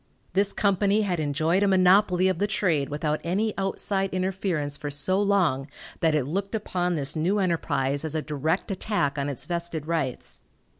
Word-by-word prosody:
This 200 +2 +2
company 200 +1 +2
had 180 -4 -1
enjoyed 155 +5 +1
a 205 - +3
monopoly 185 0 +4
of 185 -3 0
the 205 - +1
trade 180 -10 0
without 150 +1 -1
any 205 +5 0
outside 195 0 -1
interference 185 -6 -1
for 145 - -5
so 165 +8 0
long 180 -10 +2 0.3
that 160 -2 +2
it 145 -4 +1
looked 195 - -2
upon 180 -4 -1
this 145 0 -2
new 175 +6 +1
enterprise 160 -7 0
as 160 -1 -3
a 155 - 0
direct 155 +7 -1
attack 180 -8 -1
on 140 +1 -1
its 140 - -3
vested 170 -3 -3
rights. 155 -6 -3
175 Hz, 170 wpm, -26 LUFS, 150-195 Hz, 0.3 s, monopoly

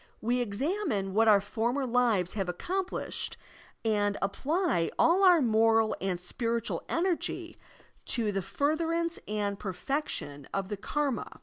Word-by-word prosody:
We 245 +2 0
examine 230 - -1
what 225 +2 +4
our 210 -2 +7
former 235 +7 -1
lives 235 -7 +2
have 195 -4 -2
accomplished 365 - -3 0.5
and 205 -2 +1
apply 270 - 0
all 360 +4 +4
our 355 -5 +7
moral 225 -1 +3
and 185 -2 -1
spiritual 230 +5 -2
energy 345 0 -1 0.5
to 225 -4 -1
the 195 -1 -1
furtherance 330 - 0
and 205 -1 -2
perfection 180 - -3
of 195 -1 -2
the 205 - -3
karma. 275 +3 -2
225 Hz, 125 wpm, -29 LUFS, 200-295 Hz, 0.5 s, our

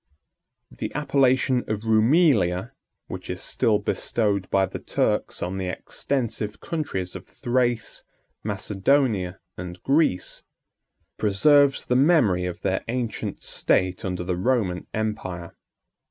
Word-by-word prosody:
] - - -54
The - - -3
appellation 135 -3 +2
of 110 0 -3
Roumelia, 110 - +3 0.3
which - - -8
is - - -3
still 110 -2 +2
bestowed 100 -1 -1
by 95 -1 +3
the - - -7
Turks - - -1
on 95 +2 -3
the 95 - -2
extensive 110 0 -3
countries 95 - -3
of - - -8
Thrace, 120 -3 -1 0.4
Macedonia, 100 -1 +1 0.2
and 90 0 -7
Greece, 140 - +1 0.8
preserves 140 +7 +4
the 125 - +1
memory 125 - +4
of 90 -1 -5
their 95 -1 0
ancient 120 -1 -3
state 90 0 +1
under 90 -2 -3
the 90 0 -2
Roman 95 -5 0
empire. 100 -6 -4
110 Hz, 120 wpm, -24 LUFS, 95-130 Hz, 0.8 s, preserves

